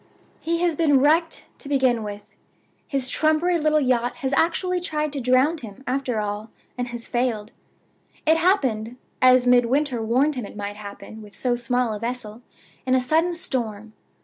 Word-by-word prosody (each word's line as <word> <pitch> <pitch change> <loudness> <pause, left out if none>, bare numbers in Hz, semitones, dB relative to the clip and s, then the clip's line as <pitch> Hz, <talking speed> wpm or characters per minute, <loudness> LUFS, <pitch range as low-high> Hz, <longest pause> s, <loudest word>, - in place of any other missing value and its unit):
"He 335 +1 -1
has 345 -3 +2
been 290 -4 +4
wrecked, 320 +4 +2
to 280 - -10
begin 260 -4 +2
with. 205 -1 -8 0.5
His 270 -3 -1
trumpery 315 +5 +2
little 305 0 +3
yacht 245 -3 +1
has 270 -1 -1
actually 360 +4 +1
tried 305 -3 -2
to 280 - -3
drown 255 +6 +3
him, 225 0 -11
after 255 -3 -1
all, 210 +1 -4 0.3
and 245 -1 -3
has 240 -1 -7
failed! 235 -3 -1 0.7
It 320 +1 +4
happened 255 - +1 0.2
(as 255 -1 +6
Midwinter 250 +1 +2
warned 255 +7 +2
him 250 -5 -4
it - - -13
might 205 0 -5
happen 210 +1 -10
with 210 -1 -14
so 245 -2 0
small 245 -1 0
a 210 - -5
vessel) 235 -1 -5 0.4
in 260 0 +2
a - - +4
sudden 320 +7 +1
storm. 220 - -4
255 Hz, 170 wpm, -23 LUFS, 230-305 Hz, 0.7 s, as